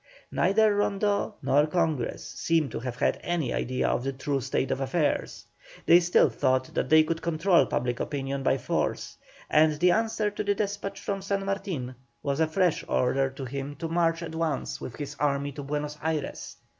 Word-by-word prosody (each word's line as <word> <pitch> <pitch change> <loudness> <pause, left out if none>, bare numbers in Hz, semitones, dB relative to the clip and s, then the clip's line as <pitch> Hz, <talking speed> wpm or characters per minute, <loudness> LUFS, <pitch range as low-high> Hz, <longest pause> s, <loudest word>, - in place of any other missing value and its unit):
Neither 210 +3 +3
Rondeau 205 +1 0
nor 145 +2 +3
Congress 160 -6 -1
seem 165 -4 0
to - - -5
have 125 0 -5
had - - 0
any 170 -7 -1
idea 130 +1 -1
of 125 - 0
the 135 - -1
true 135 +1 -2
state 130 - -1
of 135 +1 -1
affairs; 145 +3 -1 0.4
they 170 - +7
still 175 -2 +4
thought 130 +1 0
that - - -1
they 155 0 +7
could 165 +1 -2
control 170 -3 +3
public 125 -1 -1
opinion 140 -1 -3
by 135 - +2
force, 125 - -2 0.3
and 155 0 +4
the 175 +4 +3
answer 220 0 +1
to 205 - -3
the 205 0 +1
despatch 200 -1 -3
from 195 -1 -3
San 195 0 -2
Martin 190 -11 -3 0.3
was 140 0 -1
a 160 - +3
fresh 175 +1 +1
order 135 +2 +1
to 135 0 -7
him 140 +2 -5
to 165 +1 -4
march 165 0 +1
at 160 - -6
once 160 -3 -2
with 120 - -6
all - - -14
his 145 -1 -6
army 140 -1 0
to 145 - -7
Buenos 150 +1 -4
Ayres. 155 -3 -3
155 Hz, 190 wpm, -27 LUFS, 135-180 Hz, 0.4 s, they